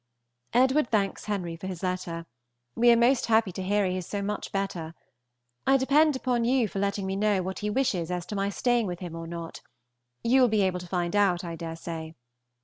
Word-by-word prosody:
Edward 260 +3 +3
thanks 200 -3 0
Henry 185 -5 -3
for 165 +3 -7
his 185 -2 -6
letter. 180 -2 -3 0.5
We 240 +1 +4
are - - +7
most 240 +2 +3
happy 220 -3 +3
to 190 - -6
hear 200 +2 +1
he 185 0 -1
is 180 - -5
so 205 -1 -3
much 210 +1 -4
better. 175 -5 -3 0.7
I 270 0 +6
depend 290 +3 +4
upon 250 -2 0
you 245 -1 +2
for 195 - -5
letting 200 0 -1
me 190 0 -2
know 200 -2 +1
what 190 +1 -4
he 210 - -2
wishes 205 -8 0
as 180 -1 -3
to 210 - -6
my 200 0 0
staying 240 +1 +1
with 175 -1 -4
him 175 -2 -7
or 165 0 -6
not; 170 0 -7 0.6
you 255 +3 +4
will 250 - +6
be 215 -2 +2
able 185 -1 0
to 180 - -9
find 175 +1 -1
out, 195 -4 +3
I 170 -1 -5
dare 165 0 -6
say. 165 -1 -7
195 Hz, 220 wpm, -27 LUFS, 175-230 Hz, 0.7 s, are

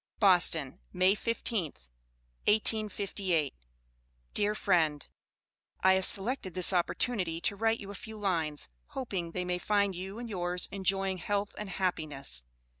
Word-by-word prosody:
BOSTON, 175 - +4
May 185 +2 +3
15th, 200 - -3 0.6
1858. 200 - +2 0.8
DEAR 210 +1 +2
FRIEND: 160 -8 +1 0.8
I 190 0 +6
have 190 0 +3
selected 200 -2 -1
this 185 0 +7
oppotunity 180 -1 0
to 200 - +1
write 225 +2 +1
you 200 0 -8
a - - -8
few 220 +2 -9
lines, 165 -7 -1 0.3
hopeing 190 -10 -4
thay 180 0 -2
may 180 0 -1
find 200 0 +1
you 190 +3 -6
and 240 0 -6
yours 180 -3 -1
enjoying 195 -1 0
helth 200 +3 -2
and 210 -2 -6
happiness. 150 - -2
190 Hz, 130 wpm, -30 LUFS, 175-205 Hz, 0.8 s, this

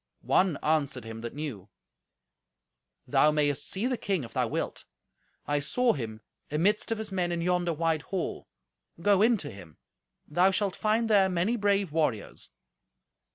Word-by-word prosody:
One 185 -5 +3
answered 145 -5 0
him 115 0 -8
that 120 +2 -6
knew, 125 -10 -6 1.4
"Thou 150 - +4
mayest 145 -2 0
see 195 +5 -2
the 255 -1 0
king 190 -7 -1
if 115 - -10
thou - - +1
wilt. - - -3 0.6
I 145 0 +1
saw 240 - +2
him 110 -6 -6 0.3
amidst 190 +10 +1
of 225 - 0
his 215 -1 -5
men 180 -2 0
in 170 - -1
yonder 175 0 +1
wide 165 -1 0
hall. 190 -3 -4 0.5
Go 200 +2 +3
in 230 +1 +5
to 150 -7 -6
him. 90 -7 -13 0.5
Thou 180 +5 +4
shalt 195 0 0
find 220 +2 +1
there 200 -3 +4
many 185 +6 +1
brave 200 -5 +1
warriors." 150 -10 -2
170 Hz, 155 wpm, -28 LUFS, 145-200 Hz, 1.4 s, in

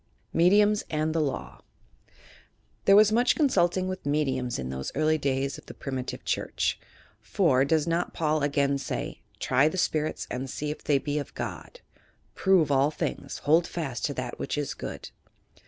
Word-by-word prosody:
MEDIUMS 205 +5 +4
AND 155 0 0
THE 160 -1 +1
I»iW 140 - -4 1.2
There 195 - +7
was 210 +1 +7
much 240 +3 +3
consulting 185 - +2
with 185 0 -5
"mediums" 135 -4 0
in 65 -1 -4
those 65 0 -4
early 155 +1 +2
days 135 -1 -1
of - - -19
the - - -10
primitive 130 -2 -5
church; - - -1 0.4
for, 140 -9 +2
does 155 +2 +2
not 170 +1 0
Paul 155 -1 0
again 140 -1 +1
say, 135 - -4 0.2
"Try 130 +3 +3
the 155 - -2
spirits 155 -3 0
and 130 +2 -4
see 150 +3 -3
if 150 - -8
they 145 - +3
be 145 +2 -2
of 145 - -7
God," - - -6 0.5
"Prove 185 -7 +3
all 140 +1 +4
things; 155 - -4
bold 160 +4 +4
fast 140 -9 -4
to - - -1
that - - -5
which - - -3
is - - -2
good." - - -7
150 Hz, 170 wpm, -27 LUFS, 140-175 Hz, 1.2 s, There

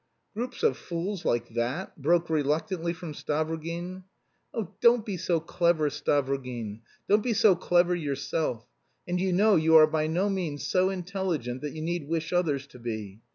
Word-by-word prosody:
"Groups 240 +4 -5
of 130 - +3
fools 175 +4 -4
like 120 - 0
that?" 120 +10 -3
broke 170 +4 +3
reluctantly 160 +3 0
from 165 -2 -7
Stavrogin. 165 +5 -3 0.5
"Oh, 220 -7 -4
don't 235 -2 +5
be 205 -4 -3
so 175 -1 0
clever, 165 -2 +1
Stavrogin; 130 -6 -1 0.3
don't 210 +2 +4
be 240 +1 0
so 205 -2 +5
clever 175 0 +3
yourself. 140 -5 -2 0.4
And 180 0 -1
you 190 0 +1
know 205 +3 +5
you 160 0 +4
are 155 -1 +10
by 155 0 0
no 175 +5 +1
means 175 -7 -2
so 185 0 +2
intelligent 180 -9 -3
that 150 -1 -4
you 155 - -5
need 170 -3 -2
wish 165 0 -2
others 150 -6 +1
to 125 - -14
be. 110 -4 -5
165 Hz, 165 wpm, -28 LUFS, 145-185 Hz, 0.5 s, are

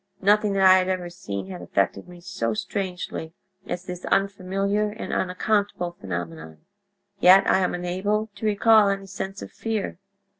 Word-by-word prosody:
"Nothing 210 +1 +4
that 195 -1 +2
I 185 0 +8
had 185 0 -1
ever 180 -2 -2
seen 175 - -6
had 180 - -7
affected 100 0 -1
me 175 -1 -13
so 115 - -2
strangely 180 - -4 0.3
as 180 +1 -4
this 180 -1 -7
unfamiliar 195 +2 0
and 220 +2 -6
unaccountable 190 -1 0
phenomenon, 80 - -7 0.6
yet 190 +1 +7
I - - +4
am 185 -1 0
unable 200 +5 -1
to 205 +2 -3
recall 215 0 +5
any 195 0 -2
sense 195 0 -6
of - - -10
fear. 220 -6 -3
190 Hz, 155 wpm, -24 LUFS, 175-200 Hz, 0.6 s, I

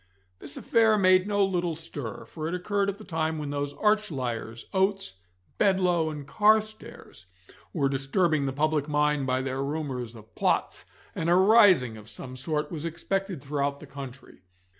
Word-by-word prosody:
This 145 0 -9
affair 220 -2 +3
made 185 -1 +4
no 205 -1 +2
little 175 -3 -1
stir, 145 -8 -7
for 155 -1 -6
it 170 - -2
occurred 200 +2 0
at 200 - -4
the 215 - -12
time 160 -4 -2
when 150 -2 -4
those 145 0 -3
arch 210 0 +2
liars, 115 -5 -4
Oates, 190 - 0 0.4
Bedloe, 180 -5 +2
and 150 -2 -7
Carstairs, 215 - 0 0.4
were 145 -5 +1
disturbing 140 +3 +1
the - - -1
public 150 +1 0
mind 150 -2 +1
by 130 0 0
their 135 0 -2
rumours 135 -5 -4
of 110 0 -15
plots, - - 0 0.3
and 165 - -2
a 175 - +5
rising 190 - +5
of 105 0 -13
some 130 0 -8
sort 150 +3 -3
was 160 -3 -5
expected 180 0 -3
throughout 140 0 -2
the - - -11
country. 135 -2 -10
155 Hz, 165 wpm, -27 LUFS, 135-190 Hz, 0.4 s, a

